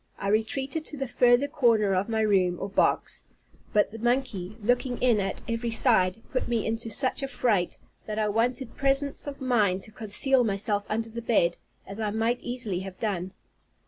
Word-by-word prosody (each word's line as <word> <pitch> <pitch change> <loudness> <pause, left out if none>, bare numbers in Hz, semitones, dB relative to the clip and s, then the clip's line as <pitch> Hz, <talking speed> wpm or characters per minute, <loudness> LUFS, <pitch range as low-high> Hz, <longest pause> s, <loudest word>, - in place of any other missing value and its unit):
I 195 - -3
retreated 265 +8 -1
to 300 - -7
the 270 -1 -3
further 245 +2 +3
corner 230 -8 +2
of 190 +4 0
my 220 -1 0
room, 190 -4 +2
or - - -3
box; 195 - 0 0.5
but 210 -1 +2
the 225 - -9
monkey, 235 -5 -1
looking 245 +3 0
in 240 -4 +2
at 195 -1 -3
every 230 0 -2
side, 225 -3 +3
put 255 - -2
me 235 -3 -1
into 225 +1 -2
such 255 +6 +3
a 275 - -2
fright, 230 -8 0 0.3
that 215 0 -4
I 215 -1 +1
wanted 235 +4 -1
presence 275 +1 +2
of 280 -1 -6
mind 215 -8 +1
to 220 - -10
conceal 240 +5 +2
myself 205 -1 0
under 225 +1 -2
the 235 +1 -6
bed, 205 -7 +1 0.3
as 195 +2 -8
I 215 -1 -1
might 225 +3 -1
easily 235 -7 -3
have 190 -1 -8
done. 190 -4 -3
225 Hz, 185 wpm, -27 LUFS, 205-245 Hz, 0.5 s, further